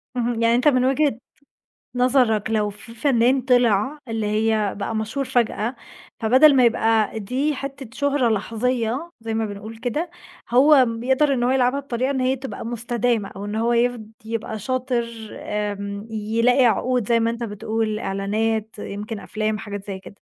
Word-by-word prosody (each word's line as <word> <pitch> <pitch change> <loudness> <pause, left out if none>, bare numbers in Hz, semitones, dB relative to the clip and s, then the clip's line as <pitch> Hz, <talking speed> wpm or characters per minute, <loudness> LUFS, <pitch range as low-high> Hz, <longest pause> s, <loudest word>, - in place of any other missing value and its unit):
اهم، 240 -1 -1
يعني 230 0 +4
أنت 250 +5 +2
من 255 -3 +4
وجهة 275 -2 +2 0.8
نظرك 245 -4 +2
لو 210 -2 +1
في 210 +3 -8
فنان 255 +1 +3
طِلع 245 +1 +2
اللي 225 -2 -2
هي 215 -1 +1
بقى 210 +2 -3
مشهور 220 +6 -2
فجأة، 235 0 0 0.4
فبدَل 260 +6 +6
ما 255 -2 +5
يبقى 225 -2 +2
دي 265 +8 -1
حتّة 270 -2 -7
شُهرة 285 -3 +1
لحظية 235 - -1
زَي 225 0 -4
ما 220 0 0
بنقول 210 +2 -8
كده، 280 +9 -2 0.4
هو 265 +2 +6
بيقدَر 260 +5 +1
إن 245 -2 0
هو 250 - +2
يلعبها 260 +1 +2
بطريقة 260 -1 -2
إن 265 - -1
هي 255 +1 +2
تبقى 265 -2 -7
مستدامة 235 -2 -1
أو 200 - -6
إن 205 +1 -4
هو 230 +2 +1
يف 240 0 +1 0.2
يبقى 220 -1 -4
شاطر 255 +1 -1 0.3
آمم، 205 0 -4
يلاقي 230 +4 +2
عقود 240 0 +1
زَي 235 -1 +3
ما 230 0 +1
أنت 235 +1 -5
بتقول 220 0 -2
إعلانات 215 +3 -1
يمْكِن 210 +2 -6
أفلام 215 +2 -2
حاجات 205 -1 -7
زَي 190 -1 -5
كده؟ 200 - -14
230 Hz, 160 wpm, -22 LUFS, 215-255 Hz, 0.8 s, فبدَل